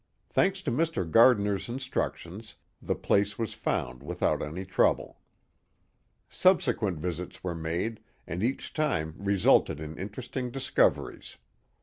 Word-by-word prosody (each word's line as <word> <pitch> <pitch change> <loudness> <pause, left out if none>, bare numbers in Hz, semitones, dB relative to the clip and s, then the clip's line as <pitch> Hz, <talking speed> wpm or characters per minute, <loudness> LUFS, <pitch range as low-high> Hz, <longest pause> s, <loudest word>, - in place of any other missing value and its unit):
Thanks 195 0 +2
to - - -1
Mr. 155 - 0
Gardiner's 105 +1 +4
instructions, 110 -5 -4 0.3
the - - -1
place 100 0 +1
was 115 -2 -2
found 60 0 -2
without - - -1
any 85 +6 -5
trouble. 90 - +1 1.1
Subsequent 115 - +2
visits 90 +2 -5
were 90 -2 -2
made, 85 +7 -3 0.3
and 85 +3 -4
each 125 +5 -2
time 80 - 0
resulted 100 -7 +3
in 80 0 -6
interesting 120 +6 -5
discoveries. 135 +2 0
100 Hz, 115 wpm, -28 LUFS, 85-125 Hz, 1.1 s, Gardiner's